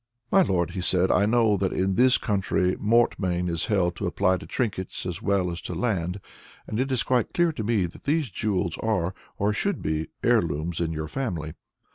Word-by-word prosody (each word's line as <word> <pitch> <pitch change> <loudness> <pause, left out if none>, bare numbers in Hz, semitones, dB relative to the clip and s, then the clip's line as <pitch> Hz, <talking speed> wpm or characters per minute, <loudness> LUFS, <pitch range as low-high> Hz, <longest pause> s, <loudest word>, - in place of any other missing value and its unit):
"My 195 - +6
lord," 85 - +1
he 95 0 -4
said, 90 +1 +2
"I 100 - +3
know 110 -2 +3
that 95 -1 0
in 95 +1 0
this 125 +5 +5
country 95 -3 0
mortmain 100 -5 +1
is 85 -2 -1
held 90 -5 +1
to - - -2
apply 95 -2 +2
to - - -10
trinkets 100 -8 -3
as 90 +1 -4
well 100 -4 +1
as 85 - -6
to 90 - -5
land, 95 -2 -1 0.5
and 110 - -4
it 135 +1 0
is 130 -3 +1
quite 125 -3 0
clear 175 -1 +3
to 115 - -5
me 105 -4 +1
that 85 - -10
these 150 -2 0
jewels 95 -6 -1
are, 95 -5 0 0.2
or 105 +1 +1
should 200 - 0
be, 80 0 -1 0.2
heirlooms 80 +3 +1
in 80 -1 0
your 80 -1 -4
family. 85 - -3
95 Hz, 200 wpm, -25 LUFS, 85-115 Hz, 0.5 s, My